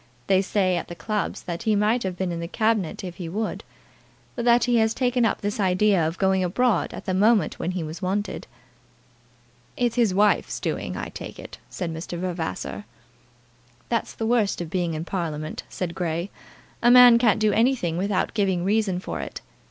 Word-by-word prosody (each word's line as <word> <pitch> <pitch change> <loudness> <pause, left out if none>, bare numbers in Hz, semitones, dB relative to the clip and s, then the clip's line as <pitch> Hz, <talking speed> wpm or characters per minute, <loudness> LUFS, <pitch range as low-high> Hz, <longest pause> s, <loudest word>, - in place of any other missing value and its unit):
They 190 -1 +3
say 190 -2 +1
at - - -4
the 175 - -8
clubs 210 +4 -3
that 170 -1 -5
he 220 -2 +1
might 215 +4 +2
have 185 -3 -3
been 185 -1 -1
in 170 - -4
the 170 - -4
Cabinet 215 -4 0
if 175 -2 -7
he 175 -3 -5
would, 215 +5 -3 0.7
but 235 - -3
that 240 0 +5
he 245 -1 +2
has 220 0 +2
taken 245 -2 +1
up - - 0
this 205 +1 -3
idea 185 -2 +3
of 165 +3 -4
going 190 -1 +2
abroad 205 +2 +1
at - - -8
the 185 - -1
moment 210 +3 +3
when - - -2
he 180 -2 -3
was 160 +3 -7
wanted." 195 +2 -2 1.3
"It's 240 -1 0
his 230 -5 +3
wife's 205 +3 +2
doing, - - -3
I - - -4
take - - -8
it," - - -10
said 170 -3 -4
Mr. 165 +2 -6
Vavasor. 170 - -4 1.0
"That's 230 -1 -1
the 225 - -3
worst 225 -3 +1
of 170 -2 -5
being 175 -3 -1
in 155 +2 -4
Parliament," 155 -5 -4
said 175 -2 -4
Grey. 170 +2 -3 0.5
"A 240 - +5
man 245 -1 +8
can't 225 -4 +3
do 215 -1 +3
anything 225 -7 +1
without 195 +2 -1
giving 195 -5 +1
a - - -3
reason 200 -2 +1
for - - -5
it. - - -6
195 Hz, 195 wpm, -24 LUFS, 175-220 Hz, 1.3 s, man